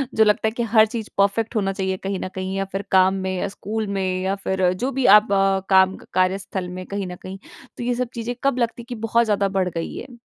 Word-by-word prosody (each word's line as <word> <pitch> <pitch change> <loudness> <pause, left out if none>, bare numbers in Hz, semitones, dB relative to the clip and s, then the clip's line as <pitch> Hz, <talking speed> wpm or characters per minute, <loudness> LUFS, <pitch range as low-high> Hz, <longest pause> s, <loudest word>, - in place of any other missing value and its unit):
जो 220 - +6
लगता 210 +1 +2
है - - 0
कि 235 +2 -3
हर 220 0 +8
चीज़ 220 0 -6
परफेक्ट 205 +4 +1
होना 195 -2 0
चाहिए 190 -1 -2
कहीं 195 -1 -2
न - - -4
कहीं 190 0 -3
या 195 - -1
फिर 195 - -2
काम 190 0 +5
में 190 0 -2
या 200 - -1
स्कूल 210 +2 -4
में 185 -1 -1
या 190 +1 0
फिर 190 -1 +2
जो 250 +9 -2
भी 270 -1 -1
आप 210 0 0
अ, 195 0 +3
काम 190 0 +5 0.2
कार्यस्थल 185 0 0
में 185 +1 -7
कहीं 200 0 -4
न 180 - -6
कहीं, 190 +2 -9 0.4
तो - - -5
ये 245 0 0
सब 250 -1 -2
चीज़ें 235 +1 -4
कब 275 -2 +2
लगती 235 0 -1
कि 245 +1 -7
बहुत 225 +1 +1
ज़्यादा 205 -2 +1
बढ़ 190 -1 0
गई 165 -1 -5
हैं? 250 -3 -9
195 Hz, 250 wpm, -22 LUFS, 190-225 Hz, 0.4 s, हर